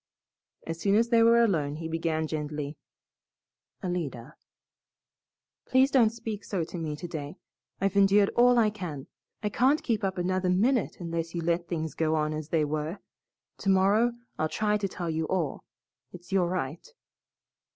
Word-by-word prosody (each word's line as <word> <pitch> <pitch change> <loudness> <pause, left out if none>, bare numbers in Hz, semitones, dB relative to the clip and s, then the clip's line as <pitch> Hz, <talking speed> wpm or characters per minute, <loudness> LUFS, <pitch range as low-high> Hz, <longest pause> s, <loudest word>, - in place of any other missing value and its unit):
As 165 0 -5
soon 200 0 +3
as 230 +2 +3
they 230 -1 +5
were 230 +1 +6
alone, 155 -9 +1
he 160 +1 -5
began 160 -1 -1
gently, 150 -1 -4 1.1
"Alida 150 -7 -4 0.7
" - - -65
"Please 260 +2 +4
don't 240 -5 +5
speak 220 -2 -6
so 185 -5 -2
to 170 +2 -6
me 155 -2 -3
today. 155 -1 -6 0.4
I've 195 0 0
endured 200 0 +5
all 245 0 +4
I 220 -3 +4
can. 165 -10 -6 0.4
I 210 - +1
can't 265 +8 +2
keep 220 -4 -1
up 190 -1 -1
another 185 +1 0
minute 225 +7 +2
unless 165 -1 -4
you 170 - -1
let 170 +1 0
things 160 -2 -3
go 160 -1 0
on 155 0 0
as 155 0 -5
they 160 -2 +2
were. 155 +4 -3 0.6
Tomorrow 200 +4 +3 0.3
I'll 155 - +1
try 210 +3 +1
to 200 -1 -1
tell 175 -3 -4
you 160 0 -1
all. 170 -7 -2 0.5
It's 180 +1 -13
your 190 -2 +3
right." 175 - -4
175 Hz, 160 wpm, -28 LUFS, 160-210 Hz, 1.1 s, were